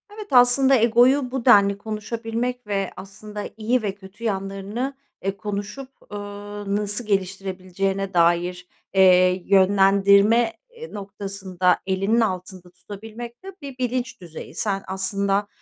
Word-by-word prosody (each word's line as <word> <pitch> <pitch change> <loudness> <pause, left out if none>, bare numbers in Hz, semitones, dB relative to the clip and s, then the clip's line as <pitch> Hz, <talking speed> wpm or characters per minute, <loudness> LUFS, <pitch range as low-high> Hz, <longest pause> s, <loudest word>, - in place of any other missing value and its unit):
Evet, 425 -1 -8
aslında 260 +2 +5
egoyu 245 +3 +4
bu 265 -3 -4
denli 200 -5 +6
konuşabilmek 225 +3 -4
ve 195 -2 -1
aslında 210 +2 -8
iyi 235 +3 +1
ve 200 -2 -3
kötü 200 +3 -14
yanlarını, 200 +6 -3 0.3
eee, 195 0 -2
konuşup, 210 +6 -5 0.2
ııı, 205 0 -5
nasıl 210 +2 -1
geliştirebileceğine 195 0 -2
dair, 175 +1 +1 0.3
eee, 185 -1 +5
yönlendirme 200 +3 +4 0.2
i 475 0 -11
noktasında 195 -3 -1
elinin 195 +5 +1
altında 185 -3 -3
tutabilmek 225 - -10
de 385 -1 -9
bir 275 -2 -8
bilinç 250 -2 -3
düzeyi. 170 -3 -10
Sen 195 -2 -1
aslında, 195 +1 0
205 Hz, 120 wpm, -23 LUFS, 195-230 Hz, 0.3 s, denli